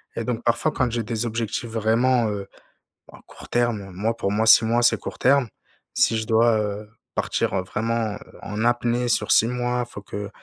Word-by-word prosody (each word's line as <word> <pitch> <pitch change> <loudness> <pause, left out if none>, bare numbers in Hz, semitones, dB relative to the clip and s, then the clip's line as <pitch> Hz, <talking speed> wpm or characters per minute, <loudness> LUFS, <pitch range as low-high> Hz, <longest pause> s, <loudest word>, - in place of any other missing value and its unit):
et 115 - -3
donc 120 -1 -3
parfois 115 +6 +1
quand 130 -4 0
j'ai 115 0 -2
des 115 +1 -3
objectifs 115 +1 -3
vraiment, 115 +2 +2
heu, 100 -2 -5 0.7
à - - -13
court - - -14
terme 120 -5 0
moi 110 +5 -1
pour 100 -4 -1
moi 110 +2 +1
6 115 - +7
mois 115 +2 +2
c'est 120 - +4
court - - -7
terme. 135 -1 +3 0.5
Si 115 - +2
je 110 - -2
dois, 115 0 +4
heu, 105 0 -4 0.3
partir, - - -1
heu, 95 - 0
vraiment, 110 +2 -2
heu, - - -10 0.2
en 105 +2 -4
apnée 120 0 +1
sur - - +1
6 115 - +5
mois, 125 0 -1
faut 110 -3 -10
que 100 +1 -6
115 Hz, 200 wpm, -23 LUFS, 110-120 Hz, 0.7 s, 6